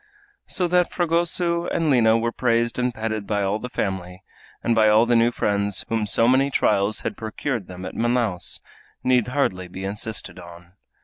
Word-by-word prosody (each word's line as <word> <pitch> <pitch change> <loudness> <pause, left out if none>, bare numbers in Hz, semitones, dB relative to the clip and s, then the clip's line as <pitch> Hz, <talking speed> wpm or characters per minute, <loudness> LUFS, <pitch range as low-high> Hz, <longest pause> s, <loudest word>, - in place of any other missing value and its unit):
So 180 - 0
that 180 0 +2
Fragoso 170 0 0
and 160 -3 0
Lina 115 -3 +4
were 115 +1 -1
praised 115 -1 0
and 125 0 +1
petted 110 -2 -4
by 105 -2 0
all 100 +2 0
the 125 - -6
family, 95 -4 -4 0.4
and 120 - +2
by 110 -1 +4
all 110 +2 +5
the 120 0 +2
new 115 +1 +4
friends 100 -3 0
whom 110 -2 0
so 115 +3 +2
many 135 +2 +3
trials 105 -5 +1
had - - -3
procured 110 0 -4
them 90 0 -8
at 95 - -6
Manaos, 115 -6 -1 0.4
need 125 -3 +3
hardly 110 -9 -1
be 95 +1 -8
insisted 105 0 -3
on. 85 0 -13
115 Hz, 180 wpm, -23 LUFS, 100-125 Hz, 0.4 s, all